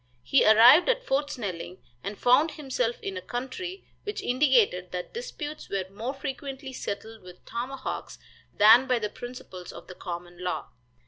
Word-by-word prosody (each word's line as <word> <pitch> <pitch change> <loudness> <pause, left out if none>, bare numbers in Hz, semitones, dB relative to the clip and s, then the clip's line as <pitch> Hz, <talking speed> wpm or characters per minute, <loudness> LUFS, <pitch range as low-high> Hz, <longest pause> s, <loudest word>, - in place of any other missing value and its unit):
He 275 - +4
arrived 235 - +8
at - - +2
Fort 285 +2 0
Snelling, 185 -6 -5 0.3
and 200 +1 -5
found 260 +6 +4
himself 250 -5 -2
in 195 -1 -4
a - - -4
country 265 - -5 0.2
which 415 0 -4
indicated 245 -9 +3
that 180 -1 -5
disputes 330 -11 -6
were 195 -2 -1
more 230 +7 -4
frequently 270 0 -6
settled 220 -1 -6
with 180 -1 -14
tomahawks 255 +3 -5 0.3
than 225 +5 +7
by 250 -2 +3
the 210 -2 -2
principles 210 -7 -9
of - - -11
the 185 - -10
common 175 0 -7
law. 180 -9 -3
245 Hz, 155 wpm, -27 LUFS, 195-270 Hz, 0.3 s, arrived